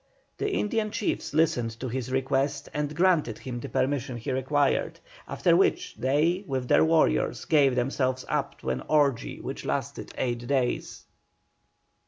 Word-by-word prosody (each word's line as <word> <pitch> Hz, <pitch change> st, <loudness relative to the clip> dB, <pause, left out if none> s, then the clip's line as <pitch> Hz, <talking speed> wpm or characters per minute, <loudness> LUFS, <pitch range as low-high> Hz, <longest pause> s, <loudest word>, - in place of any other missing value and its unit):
The 415 Hz, -, 0 dB
Indian 215 Hz, -, 0 dB
chiefs 210 Hz, -, -2 dB
listened 125 Hz, -8 st, +1 dB
to 130 Hz, -, -4 dB
his 130 Hz, +1 st, -4 dB
request 135 Hz, +2 st, 0 dB
and 150 Hz, 0 st, -2 dB
granted 170 Hz, -, +2 dB
him 125 Hz, -2 st, -6 dB
the -, -, -7 dB
permission 130 Hz, -2 st, -1 dB
he 135 Hz, +4 st, -4 dB
required, 135 Hz, +2 st, 0 dB, 0.3 s
after -, -, +2 dB
which -, -, +1 dB
they, 155 Hz, +8 st, +1 dB
with 130 Hz, -3 st, -2 dB
their -, -, +5 dB
warriors, 160 Hz, 0 st, +2 dB
gave 140 Hz, -5 st, +4 dB
themselves 130 Hz, 0 st, 0 dB
up -, -, -2 dB
to 65 Hz, -, -2 dB
an 65 Hz, 0 st, -2 dB
orgy 145 Hz, -6 st, +1 dB
which -, -, -6 dB
lasted -, -, -3 dB
eight 120 Hz, -1 st, -2 dB
days. 130 Hz, -3 st, -1 dB
135 Hz, 150 wpm, -27 LUFS, 125-150 Hz, 0.3 s, their